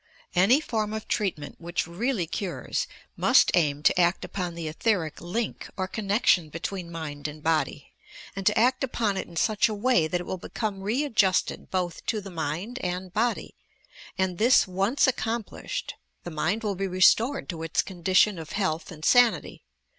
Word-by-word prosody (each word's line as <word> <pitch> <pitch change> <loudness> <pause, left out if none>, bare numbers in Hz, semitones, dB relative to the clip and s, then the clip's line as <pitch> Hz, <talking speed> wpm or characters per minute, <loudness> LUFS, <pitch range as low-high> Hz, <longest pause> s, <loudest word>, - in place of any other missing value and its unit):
Any 195 +10 +5
form 220 -7 -2
of 220 0 -5
treatmeut 170 -8 -2
which 175 +1 -2
really 200 +3 -1
cures, 180 +2 -3 0.3
must - - +5
aim 150 -4 +2
to 165 - +4
act 175 +1 +2
upon 180 -3 -4
the 170 -2 -5
etheric 165 0 -1
link 210 +6 -3
or 185 -1 -1
connection 200 -5 +2
between 170 +3 -5
mind 150 -3 -5
and 150 0 -9
body, 155 -3 -1 0.4
and 195 - -4
to 210 - +3
act 255 +3 +3
upon 230 -6 0
it 190 - -3
in 170 - -13
such 215 +6 +2
a 215 - -3
way 205 -7 +2
that 180 +2 -1
it 175 - -6
will 185 - -4
become 205 0 -4
re 225 +9 0
adjusted 205 -9 +1
both 180 -3 -2
to 220 - 0
the 195 -1 -9
miud 170 - -4
and 180 0 -3
body, 235 +4 -1 0.6
and, 190 -2 -1
this 235 0 +5
once 195 +10 +2
ac 260 - +1
complished, 225 -1 -4 0.3
the 175 - -6
mind 195 +8 -1
will 210 -2 0
be 195 +1 -2
restored 220 +9 +3
to 165 -4 -4
its 165 0 0
condition 185 +1 +2
of 160 -1 -8
health 180 -6 -1
and 155 -2 -8
sanity. 245 -2 +3
190 Hz, 175 wpm, -26 LUFS, 170-220 Hz, 0.6 s, Any